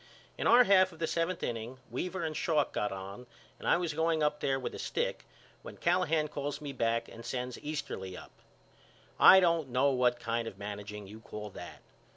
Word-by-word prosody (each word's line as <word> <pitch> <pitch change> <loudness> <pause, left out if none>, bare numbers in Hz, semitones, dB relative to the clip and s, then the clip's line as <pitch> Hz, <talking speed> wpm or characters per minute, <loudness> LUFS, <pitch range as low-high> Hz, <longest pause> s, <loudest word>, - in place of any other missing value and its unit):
In - - -1
our 240 +2 +8
half 190 -3 +5
of 165 - -14
the 165 - -1
seventh 165 +3 -1
inning 115 +2 -4
Weaver 180 +8 -3
and 155 -1 -3
Schalk 150 -3 +1
got 105 - -1
on 100 +5 -7 0.3
and - - -6
I - - +5
was 170 -3 -2
going 160 0 +1
up 150 0 +1
there 135 -1 0
with 130 - -4
a - - -7
stick - - -2 0.4
when - - -10
Callahan 165 -3 +2
calls 145 0 -4
me 145 -2 -6
back 115 -1 0
and 115 - -11
sends 125 +1 -4
Easterly 145 -12 -5
up. - - -11 0.9
I 190 - +10
don't 165 -5 +2
know 130 +3 +3
what 125 -2 +2
kind 115 0 -2
of 100 - -8
managing 105 0 -6
you 105 +3 -11
call 105 -1 -8
that. 90 -2 -10
135 Hz, 195 wpm, -31 LUFS, 115-160 Hz, 0.9 s, I